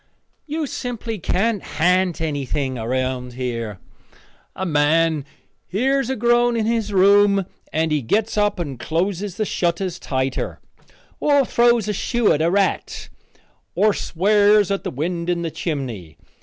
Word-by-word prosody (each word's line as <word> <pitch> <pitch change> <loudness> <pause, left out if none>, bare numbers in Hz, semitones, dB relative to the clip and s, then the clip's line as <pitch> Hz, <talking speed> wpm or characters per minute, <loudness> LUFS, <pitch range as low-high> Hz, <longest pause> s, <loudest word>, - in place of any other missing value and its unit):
You 310 +1 -2
simply 235 -5 -5
can't 205 +4 0
ha'nt 180 +1 +1
anything 140 -3 -2
around 125 +1 -2
here. 115 -5 -4 0.8
A 190 - -3
man 155 -1 +2 0.4
hears 265 +6 0
a 265 - 0
groan 240 +1 +2
in 220 - 0
his 225 -2 0
room 200 0 +4 0.3
and 160 0 0
he 150 -1 +1
gets 210 - 0
up 205 -1 +1
and 145 -8 -5
closes 185 +3 -2
the 215 - 0
shutters 175 -1 -1
tighter, 130 -1 -2 0.6
or 285 -2 +3
throws 235 -2 +3
a 210 - 0
shoe 235 +3 +1
at 150 - 0
a 165 - +3
rat, 430 - -1 0.7
or 210 0 +3
swears 205 +3 +3
at 195 - -1
the - - -3
wind 170 +5 -3
in 170 -1 0
the 165 - -3
chimney. 125 - -5
185 Hz, 140 wpm, -21 LUFS, 150-215 Hz, 0.8 s, room